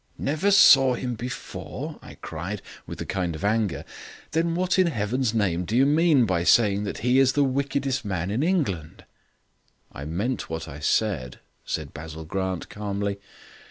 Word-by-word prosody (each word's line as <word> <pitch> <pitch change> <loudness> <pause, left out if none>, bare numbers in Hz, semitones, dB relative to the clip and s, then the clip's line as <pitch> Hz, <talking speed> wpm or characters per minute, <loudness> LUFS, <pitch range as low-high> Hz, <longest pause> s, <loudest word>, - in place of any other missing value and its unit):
"Never 155 +8 0
saw 135 -10 +7
him 125 0 -3
before!" 120 +2 -6
I - - -12
cried, - - -6 0.2
with - - -7
a - - -3
kind 90 -4 -2
of 80 - -8
anger; 105 -2 0 0.5
"then 165 +3 +1
what 185 +2 +1
in 185 - +5
heaven's 120 -2 0
name 90 -5 +1
do 110 +7 -1
you 135 - +5
mean 150 -3 +4
by 90 -4 0
saying 105 0 +4
that 100 - -4
he 125 +2 +4
is 135 -1 +4
the 145 - +3
wickedest 135 -1 -1
man 95 -3 -2
in 115 +6 0
England?" 135 - -1 0.9
"I 70 - -8
meant 100 - -2
what 80 0 -4
I 70 -1 -8
said," 75 - 0 0.3
said 75 -3 -4
Basil 80 +1 -8
Grant 95 +1 -3
calmly. 100 -1 -3
110 Hz, 165 wpm, -25 LUFS, 90-135 Hz, 0.9 s, saw